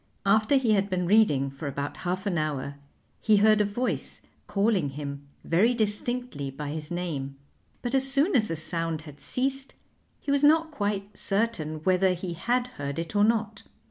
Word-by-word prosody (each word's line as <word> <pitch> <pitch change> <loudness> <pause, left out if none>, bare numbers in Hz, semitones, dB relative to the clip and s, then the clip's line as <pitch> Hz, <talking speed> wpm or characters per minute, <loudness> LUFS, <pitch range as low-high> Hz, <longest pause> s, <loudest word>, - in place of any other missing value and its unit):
After 215 +6 +4
he 255 -5 +3
had 200 -1 +2
been 180 -1 0
reading 165 -9 +3
for 140 +2 -7
about 140 +1 -4
half 185 +2 -3
an 200 -3 0
hour 145 -2 -2 0.5
he 215 -2 +4
heard 215 +1 +5
a - - +3
voice 240 +5 -2 0.2
calling 200 -7 +1
him 140 0 -6 0.2
very 215 +9 +3
distinctly 220 - -1
by 145 +2 -6
his 155 0 -5
name, 160 -6 -3 0.5
but 245 0 -2
as 270 0 +2
soon 280 +8 +2
as 220 -4 +4
the 165 - -2
sound 165 0 -2
had 150 -2 -12
ceased 270 +1 -2 0.4
he 280 - -3
was 280 0 +2
not 320 +2 +5
quite 205 -5 -3
certain 195 -8 -1
whether 185 +1 +3
he 175 0 -5
had 245 +8 0
heard 145 - -6
it 165 +5 -4
or 205 - +5
not. 220 -1 +1
195 Hz, 175 wpm, -27 LUFS, 155-230 Hz, 0.5 s, heard